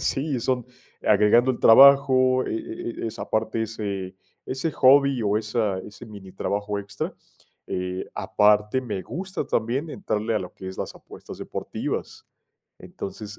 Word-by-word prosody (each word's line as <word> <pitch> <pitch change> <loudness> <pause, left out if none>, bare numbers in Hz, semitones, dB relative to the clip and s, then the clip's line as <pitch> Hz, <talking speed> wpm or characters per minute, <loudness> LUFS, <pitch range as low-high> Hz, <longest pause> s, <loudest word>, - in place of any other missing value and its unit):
Sí, 135 -1 -1
son 125 0 -1 0.4
agregando 120 +5 +4
al 125 - -3
trabajo 130 0 +6
e - - -2
e 115 +1 -5
e - - -1
esa 110 - -7
parte, 110 +1 -1
ese 100 -4 -4 0.3
ese 135 +5 -2
hobby 140 -1 +5
o 105 0 +1
esa 105 -2 -1
ese 105 +3 -11
minitrabajo 100 0 -4
extra. 100 0 -5 0.5
Eh, 90 0 -4
aparte 105 +4 +2
me 105 -7 -4
gusta 180 - -5
también 130 +5 -1
entrarle 115 - -2
a - - +2
lo 90 -1 -7
que 95 - -8
es 95 - -9
las - - -4
apuestas - - -12
deportivas. - - -5 0.5
Entonces 105 +1 -8
110 Hz, 145 wpm, -24 LUFS, 105-130 Hz, 0.5 s, trabajo